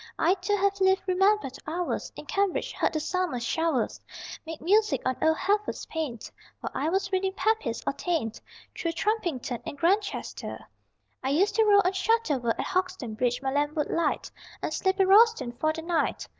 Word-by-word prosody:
I 340 Hz, +3 st, +4 dB
too 410 Hz, +1 st, -1 dB
have 395 Hz, 0 st, +1 dB
lived 380 Hz, 0 st, +4 dB
remembered 380 Hz, -6 st, +2 dB
hours 345 Hz, +3 st, -2 dB
In -, -, -9 dB
Cambridge; 400 Hz, -2 st, 0 dB
heard -, -, 0 dB
the 310 Hz, -, 0 dB
summer 360 Hz, -5 st, -1 dB
showers 305 Hz, 0 st, -1 dB, 0.5 s
Make 325 Hz, -1 st, -6 dB
music 420 Hz, +5 st, +3 dB
on 260 Hz, 0 st, +1 dB
old 320 Hz, 0 st, +3 dB
Heffer's 415 Hz, +2 st, 0 dB
pane 310 Hz, -8 st, -3 dB, 0.4 s
While -, -, -5 dB
I 310 Hz, -, -1 dB
was 385 Hz, +2 st, 0 dB
reading 380 Hz, 0 st, 0 dB
Pepys 390 Hz, -, 0 dB
or -, -, 0 dB
Taine. 280 Hz, -5 st, -1 dB, 0.4 s
Through 335 Hz, -1 st, -2 dB
Trumpington 345 Hz, -, -1 dB
and 285 Hz, -, -7 dB
Grantchester 395 Hz, +6 st, -1 dB, 0.6 s
I 265 Hz, -, 0 dB
used 350 Hz, +9 st, +2 dB
to 445 Hz, -, +3 dB
roll 405 Hz, -1 st, +6 dB
on 365 Hz, -, +3 dB
Shotover; 380 Hz, -, +1 dB
At -, -, -2 dB
Hauxton 370 Hz, -, -2 dB
Bridge 245 Hz, +3 st, -1 dB
my 265 Hz, -, 0 dB
lamp 290 Hz, +2 st, 0 dB
would 300 Hz, -2 st, -1 dB
light 335 Hz, -, 0 dB, 0.3 s
And -, -, -2 dB
sleep 380 Hz, 0 st, 0 dB
in 385 Hz, -, +4 dB
Royston 405 Hz, -, +5 dB
for 310 Hz, +6 st, 0 dB
the 325 Hz, +1 st, -6 dB
night. 335 Hz, -1 st, -1 dB
350 Hz, 180 wpm, -27 LUFS, 290-395 Hz, 0.6 s, roll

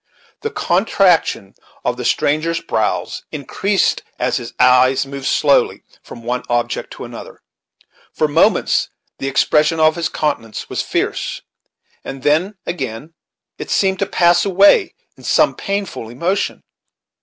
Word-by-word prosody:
The 445 Hz, -, -2 dB
contraction 180 Hz, -, +1 dB, 0.3 s
of 125 Hz, -, 0 dB
the 125 Hz, -1 st, -6 dB
stranger's 155 Hz, +6 st, +1 dB
brows 110 Hz, -9 st, -2 dB
in 140 Hz, -3 st, -6 dB
creased 200 Hz, +6 st, +1 dB, 0.2 s
as 125 Hz, +1 st, 0 dB
his 120 Hz, -2 st, -6 dB
eyes 125 Hz, +1 st, +4 dB
moved 135 Hz, 0 st, -6 dB
slowly 140 Hz, -2 st, +2 dB, 0.2 s
from 115 Hz, -, -12 dB
one 125 Hz, +2 st, -2 dB
object 120 Hz, 0 st, -1 dB
to -, -, -9 dB
another. -, -, -11 dB, 0.7 s
For 155 Hz, -, 0 dB
moments 150 Hz, +3 st, +2 dB, 0.3 s
the 135 Hz, -, -3 dB
expression 150 Hz, +3 st, +2 dB
of 155 Hz, 0 st, +4 dB
his 165 Hz, -1 st, -2 dB
countenance 140 Hz, -8 st, -3 dB
was -, -, -2 dB
fierce, -, -, -2 dB, 0.6 s
and 135 Hz, -1 st, -8 dB
then 165 Hz, +8 st, +2 dB
again 140 Hz, -2 st, -5 dB, 0.5 s
it -, -, -6 dB
seemed 190 Hz, -1 st, +1 dB
to 200 Hz, -, 0 dB
pass 175 Hz, -1 st, +3 dB
away 200 Hz, -, +4 dB, 0.2 s
in -, -, -16 dB
some -, -, +3 dB
painful 200 Hz, -, -4 dB
emotion. 170 Hz, -, -2 dB
150 Hz, 135 wpm, -18 LUFS, 125-180 Hz, 0.7 s, eyes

